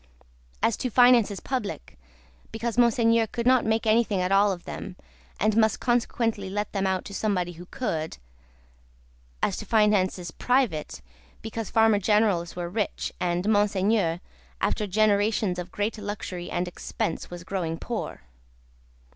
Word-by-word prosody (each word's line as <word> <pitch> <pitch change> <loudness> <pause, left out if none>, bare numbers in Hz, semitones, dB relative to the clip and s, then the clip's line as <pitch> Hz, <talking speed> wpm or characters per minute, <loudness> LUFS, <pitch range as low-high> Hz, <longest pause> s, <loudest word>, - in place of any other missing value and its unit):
As 230 - +2
to 255 - -2
finances 240 -4 +5
public, 250 -6 -4 0.6
because 225 +1 -3
Monseigneur 230 -1 +3
could 235 +2 -4
not 255 -2 +4
make 220 +1 +1
anything 220 -2 +2
at 180 +1 0
all 200 +1 +5
of 175 -2 -5
them, - - -7 0.4
and 215 0 +2
must 220 -1 +3
consequently 230 -4 0
let 205 +2 -3
them 195 -1 0
out 190 -1 -1
to 200 - -8
somebody 190 -4 -1
who 175 +1 -12
could; 160 -12 -3 1.3
as - - +1
to - - -6
finances 195 -5 +2
private, 200 - 0 0.4
because 225 -1 -5
Farmer 220 -2 +4
Generals 200 -4 +1
were 175 -1 -3
rich, 205 +3 -3
and 175 +2 -1
Monseigneur, 205 -4 +2 0.4
after 210 - 0
generations 205 -1 +2
of 180 - -6
great 210 +2 -2
luxury 200 -4 -5
and 175 0 -2
expense, 170 -1 -4
was 175 0 -8
growing 170 -4 -3
poor. 235 +4 -5
205 Hz, 140 wpm, -26 LUFS, 180-225 Hz, 1.3 s, finances